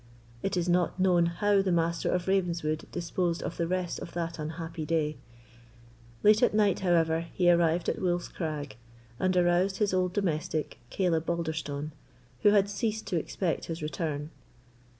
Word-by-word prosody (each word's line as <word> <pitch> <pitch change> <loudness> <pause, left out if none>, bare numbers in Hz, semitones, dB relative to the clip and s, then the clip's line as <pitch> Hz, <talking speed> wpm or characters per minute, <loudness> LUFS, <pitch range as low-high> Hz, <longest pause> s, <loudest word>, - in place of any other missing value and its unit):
It 195 -1 -1
is 175 0 0
not 175 +1 +1
known 180 -2 +4
how 200 +4 +2
the 190 -1 0
Master 170 0 +1
of 180 0 -1
Ravenswood 170 -5 0
disposed 175 0 -1
of - - -5
the 170 - 0
rest 180 -1 -2
of - - -8
that 170 -1 -3
unhappy 160 +1 -5
day. 155 -1 0 1.1
Late 210 +1 +6
at 245 - +3
night, 205 -3 +3
however, 165 -2 +2
he 175 -1 +5
arrived 170 0 +2
at - - -1
Wolf's 175 -1 0
Crag, 150 -6 -5 0.4
and 185 0 +1
aroused 180 +2 +3
his 205 -3 +1
old 180 -1 +1
domestic, 160 -5 -2
Caleb 165 -4 0
Balderstone, 160 -3 -2 0.5
who 210 - +6
had 205 -1 +4
ceased 220 +2 -2
to 185 - -1
expect 165 +2 -2
his 165 -1 -5
return. 150 0 -3
175 Hz, 160 wpm, -29 LUFS, 160-185 Hz, 1.1 s, Late